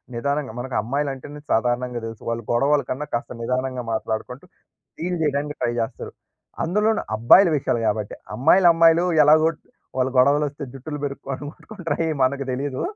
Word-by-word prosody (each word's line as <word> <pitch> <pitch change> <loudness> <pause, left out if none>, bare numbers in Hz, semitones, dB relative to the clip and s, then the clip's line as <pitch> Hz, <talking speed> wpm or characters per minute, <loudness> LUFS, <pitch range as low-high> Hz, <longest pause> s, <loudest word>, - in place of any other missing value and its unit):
నిదానంగా 140 +1 -2
మనకు 130 0 -5
అమ్మాయిలంటేనే 140 +4 -4
సాధారణంగా 120 +1 0
దెలుసు. 115 -1 -8
వాళ్ళు 115 0 -3
గొడవల 140 +5 +3
కన్నా 135 +4 -3
కాస్త 120 - -2
నిదానంగా 125 +1 -2
మాట్లాడుకుంటూ 110 +6 -4 0.5
డీల్ 180 +2 -2
చేయడానికి 145 0 -1
ట్రై 120 - +1
జేస్తరు. 115 +1 -4 0.5
అందులోను 210 +6 +1
అబ్బాయిల 145 - +6
విషయాలు 120 -4 -1
గాబట్టి. 105 -1 -2 0.2
అమ్మాయిలు, 165 - +5
అమ్మాయిలు 165 +1 +5 0.2
ఎలాగో 155 +2 +5 0.5
వాలు 130 0 +1
గొడవలొస్తే 145 +2 +2
జుట్టులు 145 +3 -7
పెరుక్కోడం 140 -1 -5
కొట్టు‌కుంటరు 175 -6 -5
అయి 160 - 0
మనకు 140 +2 +1
దెలీదు. 130 +1 -3
140 Hz, 140 wpm, -23 LUFS, 125-150 Hz, 0.5 s, అబ్బాయిల